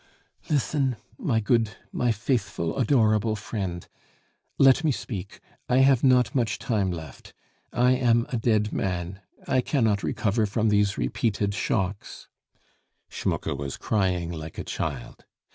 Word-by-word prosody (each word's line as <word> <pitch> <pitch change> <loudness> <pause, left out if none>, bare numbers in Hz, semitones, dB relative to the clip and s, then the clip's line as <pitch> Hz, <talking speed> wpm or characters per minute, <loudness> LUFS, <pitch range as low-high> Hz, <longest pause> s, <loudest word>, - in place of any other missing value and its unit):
"Listen, 140 -3 +1 0.2
my 115 -5 +1
good, 110 -1 +1 0.2
my 125 -1 +1
faithful, 105 -7 -1
adorable 110 -4 +2
friend. 95 -5 -5 0.7
Let 135 +3 +5
me 155 - +3
speak, 100 -7 -6 0.3
I 125 - +3
have 135 -2 +4
not 125 -3 +4
much 120 -5 0
time 105 -7 0
left. 80 -6 -8 0.4
I 125 +2 +3
am 120 -2 +3
a 125 - -1
dead 110 -2 +1
man. 90 0 -3 0.3
I 130 - +2
cannot 110 -8 +1
recover 110 0 0
from 110 +2 +1
these 105 -1 +2
repeated 100 -3 -1
shocks." 100 -3 -3 0.8
Schmucke - - -2
was 70 0 -5
crying 90 -5 0
like 80 -1 -7
a - - -3
child. - - -5
110 Hz, 130 wpm, -26 LUFS, 95-125 Hz, 0.8 s, Let